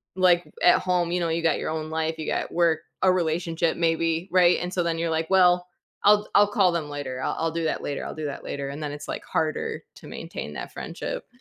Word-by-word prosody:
like, 180 -2 +4 0.2
at 175 - +6
home, 180 -2 0
you 180 - +1
know, 170 -1 0
you 165 +1 0
got 165 -2 +2
your - - -3
own 155 0 -3
life, 160 0 -2
you 155 - -4
got - - -2
work, 170 -2 +3 0.2
a 190 - +5
relationship 165 -1 0
maybe, 165 +1 0
right, 180 -1 +5
and 180 0 -3
so 175 - +1
then 165 -1 -1
you're. 165 0 0
like, 160 0 -1
well, 180 -1 +4 0.4
I'll 210 0 +5
I'll 205 - +7
call 190 -4 +4
them 165 -3 -2
later, 145 -3 -5
I'll - - -1
I'll 165 0 0
do 165 0 -2
that 155 - -1
later, 145 - -3
I'll - - -5
do 155 - -5
that 145 - -5
later, 140 -1 -4
and 145 +2 -6
then 145 - -3
it's, 145 0 -8
like, - - -4
harder 160 - -2
to - - -13
maintain - - -7
that - - -6
friendship. - - -6
165 Hz, 240 wpm, -25 LUFS, 160-180 Hz, 0.4 s, I'll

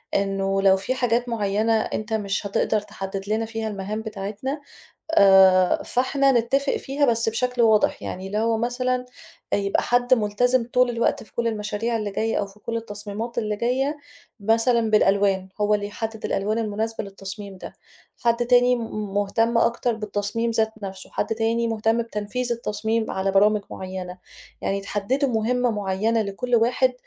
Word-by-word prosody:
إنه 195 0 0
لو 195 -1 +5
في 245 +7 -2
حاجات 245 -1 0
معيّنة 215 0 +1
أنت 215 +1 -4
مش 200 -2 -1
هتقدر 210 +2 +1
تحدّد 195 -1 -6
لنا 220 +1 0
فيها 225 0 -4
المهام 210 +1 -4
بتاعتنا، 220 +7 -5 0.5
آآ، 190 - +6
فاحنا 270 +2 +2
نتّفق 270 +4 +1
فيها 280 +2 0
بس 230 -2 +2
بشكل 250 +2 0
واضح، 220 -2 +3
يعني 185 +1 -5
اللي 205 +2 -2
هو 225 0 +1
مثلًا 250 +2 -1 0.5
يبقى 200 -1 +1
حد 245 +1 +3
ملتزِم 235 +3 +1
طول 250 -1 +4
الوقت 235 -1 0
في - - -17
كل 235 - -2
المشاريع 215 +1 -2
اللي 210 -2 -3
جايّة 220 +3 -1
أو 200 - -1
في 200 +1 -18
كل 230 +2 -4
التصميمات 220 +2 -5
اللي 215 -2 -1
جايّة 260 +6 0 0.4
مثلًا 225 +2 +2
بالألوان، 195 -2 +3
هو 210 0 +3
اللي 205 -1 -1
يحدّد 220 +1 -6
الألوان 210 +3 0
المناسبة 220 0 -2
للتصميم 195 0 -8
ده، - - -9 0.5
حد 235 0 +2
تاني 245 0 +5
م 215 -4 -5
مهتم 225 +3 +1
أكتر 235 +1 +1
بالتصميم 210 +2 -2
ذات 220 -1 +1
نّفْسه، 190 -1 -7
حد - - -1
تاني 230 +1 0
مهتم 225 +1 +1
بتنفيذ 230 +3 -3
التصميم 220 0 -2
على 190 +1 0
برامج 210 +2 +4
معيّنة، 185 -1 -6 0.4
يعني 200 0 -1
تحدّدوا 225 +8 -1
مهمّة 245 +2 +1
معيّنة 210 +2 0
لكل 215 +5 -2
واحد 250 +3 +2
220 Hz, 155 wpm, -23 LUFS, 200-235 Hz, 0.5 s, آآ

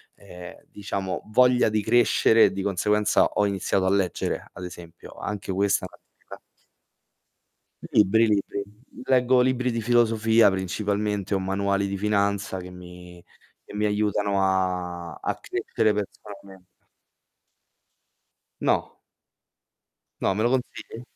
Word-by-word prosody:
ehm, 90 -3 -11
diciamo 100 -2 -4
voglia 125 0 +4
di 110 0 0
crescere 115 0 +4
e - - +1
di 95 - -4
conseguenza 105 +2 +2
ho 105 - 0
iniziato 95 -1 0
a - - +2
leggere, 95 -3 -1
ad 90 - -8
esempio. 85 -2 -11
Anche 100 -2 -5
questa 100 -1 +1
è - - -8
un'attività - - -16 1.5
Libri, 110 +3 +4
libri. 100 -1 -1 0.4
Leggo 125 -1 +3
libri 125 0 +1
di 115 0 -2
filosofia 115 -1 +3
principalmente 100 +2 -2
o 95 - +1
manuali 100 +1 -1
di 100 0 -3
finanza 100 -1 0
che 90 0 -9
mi 90 -1 -12 0.4
che - - -13
mi 105 0 0
aiutano 105 -1 0
a 90 -3 -1
a - - -3
crescere 110 -1 -1
personalmente. 100 -2 -8 1.9
No. - - 0 1.2
No, 95 - +1
me 105 +3 -1
lo 120 - +3
consigli? 125 -2 -4
100 Hz, 120 wpm, -25 LUFS, 95-110 Hz, 1.9 s, voglia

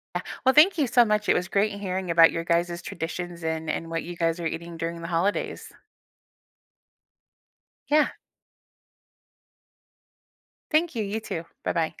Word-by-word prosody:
Yeah. - - -1 0.2
Well, 260 - +5
thank 330 +6 +7
you 295 -5 +2
so 240 +1 +5
much, 210 -1 0
it - - +5
was 180 - 0
great 205 +2 +1
hearing 185 -2 -3
about 165 -1 +7
your 165 - -2
guys' 170 +1 0
traditions 175 0 -5
and 160 -1 -2
and 165 - -3
what 165 0 -2
you 175 0 -8
guys 165 0 0
are 165 - -3
eating 170 +1 -5
during 170 +1 -4
the 165 - -4
holidays. 180 +4 -1 2.2
Yeah. 300 +1 +4 2.6
Thank 315 -1 +2
you, 225 - -1
you 210 +2 -3
too. 190 -6 -5 0.2
Bye-bye. 165 -2 -1
175 Hz, 150 wpm, -26 LUFS, 165-210 Hz, 2.6 s, thank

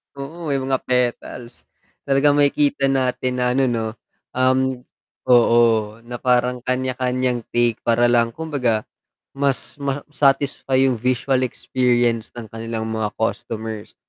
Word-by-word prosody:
Oo, 155 +4 -7
may 140 - 0
mga 130 0 -1
petals. 125 -1 -2 0.4
Talagang 145 +1 +3
makikita 145 -1 +2
natin 130 -1 0
na 125 0 0
ano, 135 +2 +2
'no, 115 -2 -1 0.4
um 130 0 +1 0.5
oo, 115 -3 +4
na 120 - -6
parang 125 0 +1
kanya-kanyang 130 -1 -1
take 120 -1 +1
para 120 +1 +3
lang 120 -1 +2
kumbaga 125 -7 -2 0.4
mas 140 0 -2
ma-satisfy 140 -1 0
yung 120 - -2
visual 130 +2 +1
experience 120 -2 0
ng 115 -3 -9
kanilang 115 0 -5
mga 110 -1 -2
customers. 110 -1 -4
125 Hz, 120 wpm, -21 LUFS, 115-135 Hz, 0.5 s, oo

